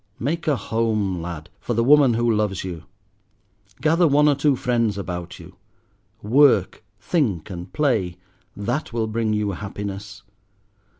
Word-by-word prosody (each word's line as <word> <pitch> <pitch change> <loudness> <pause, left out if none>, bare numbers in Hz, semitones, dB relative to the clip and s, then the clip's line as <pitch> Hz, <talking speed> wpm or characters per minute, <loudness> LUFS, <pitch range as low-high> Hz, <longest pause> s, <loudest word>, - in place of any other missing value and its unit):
Make 160 +6 -3
a 150 - +3
home, 110 -5 -1
lad, 85 -1 -7
for 120 - -3
the 115 - +2
woman 140 -2 +5
who 120 0 +2
loves 105 -3 -1
you; 90 -3 -7 1.0
gather 165 +2 +4
one 150 +1 +4
or 145 - +5
two 140 0 +2
friends 115 -4 0
about 90 -3 -5
you; - - -14 0.7
work, 115 -4 +3 0.2
think, 105 - -1
and 90 0 -7
play, 110 - 0 0.4
that 120 +10 -2
will 115 -1 0
bring 110 0 -1
you 105 -1 0
happiness. 100 0 -7
110 Hz, 140 wpm, -22 LUFS, 95-135 Hz, 1.0 s, woman